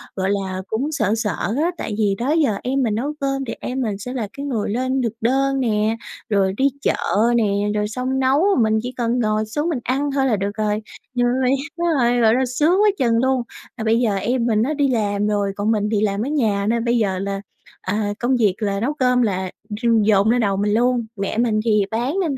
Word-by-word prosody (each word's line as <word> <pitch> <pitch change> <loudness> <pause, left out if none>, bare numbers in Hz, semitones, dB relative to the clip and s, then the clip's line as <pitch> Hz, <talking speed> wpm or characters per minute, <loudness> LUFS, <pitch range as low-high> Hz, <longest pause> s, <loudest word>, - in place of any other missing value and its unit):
gọi 190 0 -1
là, 190 -2 -2
cũng 265 +8 -2
sợ 215 -8 0
sợ 210 -4 -1 0.3
á, 345 - +1
tại 215 - -4
thì 205 -3 +1
đó 255 +5 -1
giờ 300 -10 +2
em 265 +2 0
mình 220 -4 0
nấu 275 +7 -2
cơm 275 -1 -1
thì 230 - -4
em 255 +1 -3
mình 215 -5 -2
sẽ 250 +5 -6
là 235 -5 -3
cái 280 - -4
người 235 -8 -2
lên 255 +4 0
thực 230 -3 -1
đơn 270 +3 +1
nè, 220 -3 +1 0.3
rồi 195 -2 +2
đi 270 - +2 0.2
chợ - - +1 0.4
nè, 210 -4 +2 0.2
rồi 210 0 0
xong 255 +4 -2
nấu, 265 +3 +3 0.2
mình 220 0 +2
chỉ 250 - -4
cần 240 0 0
ngồi 215 -1 +1
xuống 295 +10 -2
mình 295 - -1
ăn 280 +3 -1
thôi 270 -1 +1
là 240 -5 +2
được 200 +1 -2
rồi. 215 0 0 0.3
Rồi 245 0 +2 0.4
đúng 345 - 0
rồi, 240 0 +2
gọi 220 -1 +5
là, 260 0 +2
sướng 305 +10 +2
quá 425 - +5
chừng 230 -3 +2
luôn! 260 0 +2 0.4
Mà 220 - -4
bây 225 +1 +2
giờ 220 -5 +1
em 235 +4 0
mình 215 -2 +2
nó 270 +7 0
đi 285 -2 +1
làm 210 -4 0
rồi, 205 -1 0
còn 205 +2 0
mình 210 -1 0
thì 210 -2 +1
làm 200 -1 0
ở - - -3
nhà 220 -9 +1
nên 235 0 0
bây 240 0 +2
giờ 195 -5 0
là, 195 0 -3 0.4
à, 205 +2 -1
công 250 +2 +1
việc 210 -6 +2
là 200 -2 -1
nấu 250 +8 -1
cơm 250 -3 +2
là 190 -5 -1 0.3
d - - -4 0.2
dồn 205 0 +3
lên 245 +1 +3
đầu 200 -3 +1
mình 205 +1 +1
luôn, 240 +1 +2
mẹ 200 +1 -3
mình 225 -2 +2
thì 210 -3 +3
bán 240 +8 -1
nên 305 -7 -1
230 Hz, 240 wpm, -21 LUFS, 210-260 Hz, 0.4 s, gọi